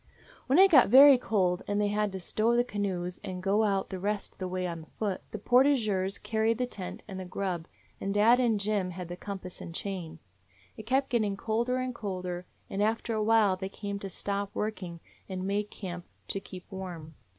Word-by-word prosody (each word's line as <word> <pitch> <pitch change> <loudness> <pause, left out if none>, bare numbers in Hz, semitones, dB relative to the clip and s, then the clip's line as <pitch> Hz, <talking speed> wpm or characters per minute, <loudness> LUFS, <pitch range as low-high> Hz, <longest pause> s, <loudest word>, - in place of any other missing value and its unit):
"When 265 - +4
it 385 +1 +7
got 265 -9 +7
very 270 +2 +9
cold 185 -6 +1
they 205 0 +1
had 210 0 0
to 190 - -4
stow 220 +6 +1
the 240 - +4
canoes 185 -6 -3
and 185 -1 -5
go 200 0 +2
the 190 - -6
rest 205 +2 -2
of - - -29
the 185 - -2
way 185 0 -2
on 170 -2 -4
foot. 200 -4 -1
The - - -5
portageurs 215 -5 +3
carried 220 0 0
the 250 - 0
tent 195 -7 -7
and 190 -2 -6
the 185 - -5
grub, 180 -2 -3 0.3
and 195 - -2
dad 220 +5 +5
and 230 -4 +2
Jim 200 -2 0
had 180 -1 -7
the 175 - -4
compass 185 -1 -7
and 165 - -8
chain. 175 -5 -5 0.6
It 220 - -10
kept 265 +3 +2
getting 215 -6 +1
colder 235 +4 0
and 255 0 -2
colder, 185 -5 -4 0.2
and 195 - -3
after 225 +2 0
a 215 - 0
while 215 -3 +4
they 190 0 -4
had 200 0 -5
to 195 - -5
stop 200 +2 -3
working 185 -6 -4 0.3
and 185 -1 -4
make 205 +1 -1
camp 180 -3 -7 0.2
to 195 - -1
keep 185 -1 -11
warm. 175 -5 -7
200 Hz, 200 wpm, -29 LUFS, 185-220 Hz, 0.6 s, very